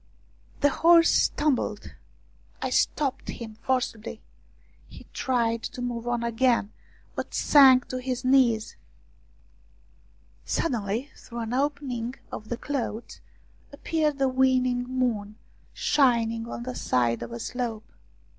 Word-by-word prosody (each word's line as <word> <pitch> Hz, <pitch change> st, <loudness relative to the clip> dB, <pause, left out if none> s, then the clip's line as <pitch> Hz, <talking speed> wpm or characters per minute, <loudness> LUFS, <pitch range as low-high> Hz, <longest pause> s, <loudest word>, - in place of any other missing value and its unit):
The 285 Hz, -, +5 dB
horse 335 Hz, +2 st, +5 dB
stumbled; 260 Hz, -8 st, 0 dB, 0.7 s
I -, -, -3 dB
stopped 275 Hz, -3 st, 0 dB
him 225 Hz, -2 st, -7 dB
forcibly; 230 Hz, -3 st, -2 dB, 0.6 s
he -, -, -13 dB
tried 230 Hz, -3 st, 0 dB
to 250 Hz, -, -6 dB
move 240 Hz, -1 st, -4 dB
on 240 Hz, -1 st, -1 dB
again, 235 Hz, -2 st, +1 dB, 0.4 s
but -, -, -5 dB
sank 265 Hz, -3 st, +6 dB
to 255 Hz, -, -3 dB
his 255 Hz, 0 st, -4 dB
knees. 250 Hz, -4 st, +3 dB, 1.7 s
46 -, -, 0 dB
ROUMANIAN 250 Hz, -9 st, -1 dB
STORIES 200 Hz, +3 st, -2 dB
Suddenly, 290 Hz, -, -23 dB, 0.2 s
through 235 Hz, 0 st, -6 dB
an 225 Hz, +1 st, -4 dB
opening 265 Hz, -3 st, -2 dB, 0.2 s
in -, -, -4 dB
the 240 Hz, -, -3 dB
clouds, 240 Hz, -5 st, -4 dB, 0.5 s
appeared 300 Hz, 0 st, -1 dB
the 270 Hz, -1 st, +2 dB
waning 255 Hz, -1 st, +2 dB
moon, 240 Hz, -5 st, -2 dB, 0.4 s
shining 230 Hz, -5 st, +1 dB
on 235 Hz, -, -6 dB
the 255 Hz, +1 st, -5 dB
side 120 Hz, -, 0 dB
of 120 Hz, 0 st, -6 dB
a 120 Hz, -, -6 dB
slope. 230 Hz, -, -4 dB
245 Hz, 125 wpm, -26 LUFS, 230-265 Hz, 1.7 s, sank